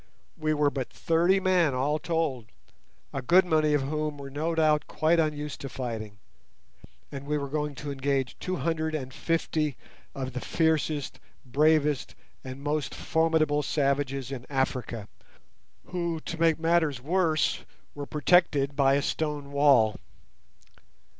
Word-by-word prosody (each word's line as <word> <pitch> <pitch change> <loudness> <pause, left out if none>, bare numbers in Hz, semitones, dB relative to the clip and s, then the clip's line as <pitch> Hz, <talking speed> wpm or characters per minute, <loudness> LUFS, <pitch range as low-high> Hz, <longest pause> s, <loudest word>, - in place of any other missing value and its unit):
We 155 -1 0
were 145 -1 +2
but 130 -3 -4
thirty 175 +3 +2
men 180 -7 +2
all 145 +4 0
told, 155 -9 -2 0.7
a 135 - -2
good 180 +8 +5
many 155 -3 +2
of 140 - +1
whom 150 +1 -2
were 140 -1 -8
no 160 +4 -2
doubt 155 -2 +2
quite 165 +2 +2
unused 150 -2 -2
to 135 - -5
fighting, 110 -5 -5 0.9
and 140 0 -7
we 150 0 0
were 140 -1 -3
going 150 0 -2
to 145 +2 -5
engage 135 -2 -1
two 185 - -2
hundred 160 -2 -1
and 130 -3 -5
fifty 155 -3 -1 0.4
of 130 -2 -4
the 125 - -4
fiercest, 160 -3 0 0.3
bravest, 150 +2 +2 0.3
and 130 +1 -8
most 150 0 -2
formidable 160 -2 +1
savages 140 -2 -1
in 125 -2 -6
Africa, 125 -5 -2 0.8
who, 170 -2 -3
to 165 - -6
make 165 -1 +4
matters 165 -4 +2
worse, 160 +2 +1 0.3
were 145 -1 -6
protected 145 -3 +2
by 135 -1 +4
a 140 - +1
stone 150 -3 -2
wall. 140 -7 +4
150 Hz, 140 wpm, -27 LUFS, 135-160 Hz, 0.9 s, good